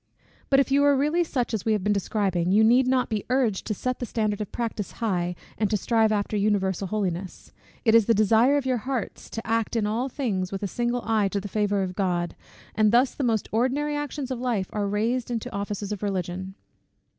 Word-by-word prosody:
But 270 - +5
if 275 - +1
you 280 +1 +4
are 285 0 +5
really 300 +6 +2
such 250 -8 -2
as 215 - -1
we 220 - +2
have 210 -3 -1
been 205 +1 +2
describing, 190 -3 0
you 210 +3 +5
need 245 +3 +5
not 255 -1 +2
be 215 -3 -2
urged 250 -6 +1
to 215 - -1
set 255 +5 -2
the 245 - -2
standard 215 -2 -1
of 210 - -5
practice 225 -4 -4
high, 180 -6 -1 0.2
and 210 -2 +1
to 215 - +1
strive 220 +2 +2
after 210 0 -1
universal 200 -2 +1
holiness. 190 -2 -3 0.3
It 220 - +5
is 230 -2 +5
the 230 - +4
desire 225 +6 +4
of 280 - -2
your 255 -1 +1
hearts 255 0 -4
to 225 - -6
act 225 0 0
in 220 -2 +1
all 230 +6 -1
things 200 -9 -2
with 195 +1 -4
a - - 0
single 240 +3 -1
eye 220 -3 +2
to 200 +1 -2
the 205 - -6
favour 205 -1 0
of 185 -1 -4
God, 180 -3 -1 0.4
and 215 -1 +3
thus 245 +3 +4
the 280 - -3
most 225 -4 +1
ordinary 265 +6 0
actions 290 -2 -4
of 255 - -3
life 235 -7 -1
are 205 -1 -1
raised 225 +5 -1
into 230 -2 -4
offices 200 0 -4
of 205 - -4
Religion. 190 -1 -3
215 Hz, 225 wpm, -25 LUFS, 200-245 Hz, 0.4 s, But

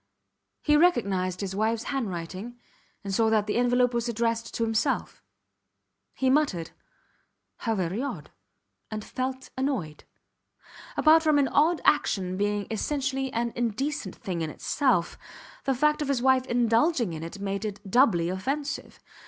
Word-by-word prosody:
He 300 - +4
recognized 200 - +2
his 190 -1 -3
wifes 220 +2 0
handwriting 205 -2 -4 0.5
and 195 -1 -4
saw 220 +3 +3
that 215 -2 +2
the 210 - -1
envelope 245 0 +3
was 235 0 -1
addressed 230 0 -1
to 230 - 0
himself. 225 +5 -1 0.9
He 265 - 0
muttered, 260 - +1 0.9
How 225 -1 -1
very 185 +3 -1
odd, 280 - -5 0.6
and 215 -1 -5
felt 260 0 -4
annoyed. 260 - -3 0.9
Apart 315 +1 +6
from 310 -2 +3
any 280 -2 +3
odd 320 +3 +3
action 185 -10 +2
being 205 +1 0
essentially 270 +3 -1
an 235 0 -1
indecent 240 - -2
thing 185 -6 -4
in 160 - -2
itself, 245 - 0 0.5
the 270 - +1
fact 300 +4 +2
of 295 - -1
his 275 -3 +1
wife 260 0 +3
indulging 235 - +2
in 155 - -6
it 170 +4 -7
made 200 +1 -3
it 210 -1 -4
doubly 195 -6 +4
offensive. 275 +11 -3
235 Hz, 145 wpm, -27 LUFS, 200-270 Hz, 0.9 s, Apart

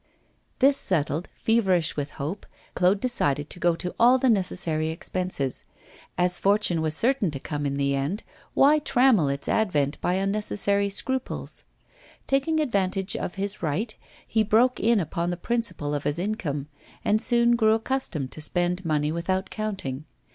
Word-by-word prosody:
This 275 +1 +4
settled, 160 -1 -1
feverish 190 -8 +1
with 145 -1 -4
hope, 155 +9 -5 0.3
Claude 185 +2 +3
decided 145 - 0
to - - -8
go 175 -1 +2
to 180 +2 -5
all 245 +2 +6
the 260 -1 +3
necessary 175 -6 0
expenses; 165 -4 -3 0.5
as 180 0 +1
fortune 200 -4 +2
was 155 0 0
certain 245 -6 +2
to 140 -3 -5
come 145 +1 -3
in 140 0 -2
the 140 0 +1
end, 140 +10 -2 0.3
why 295 +3 +5
trammel 250 - +3
its 140 0 -3
advent 150 -10 0
by 180 - +1
unnecessary 200 0 0
scruples? 260 +6 -3 0.6
Taking 275 +4 +1
advantage 195 -7 0
of 175 - -4
his 200 +1 -4
right, 185 +8 -1 0.3
he 220 - +2
broke 225 +4 +3
in 230 0 +3
upon 170 0 -2
the 175 - -2
principal 185 -9 -1
of 145 -1 -3
his 145 +2 0
income, 175 -8 -2 0.4
and 215 +1 +2
soon 240 -1 +3
grew 220 -2 +4
accustomed 225 - -2
to 155 - -9
spend 175 +3 -1
money 150 -2 0
without 185 +3 -2
counting. 190 -11 -4
185 Hz, 155 wpm, -25 LUFS, 155-220 Hz, 0.6 s, all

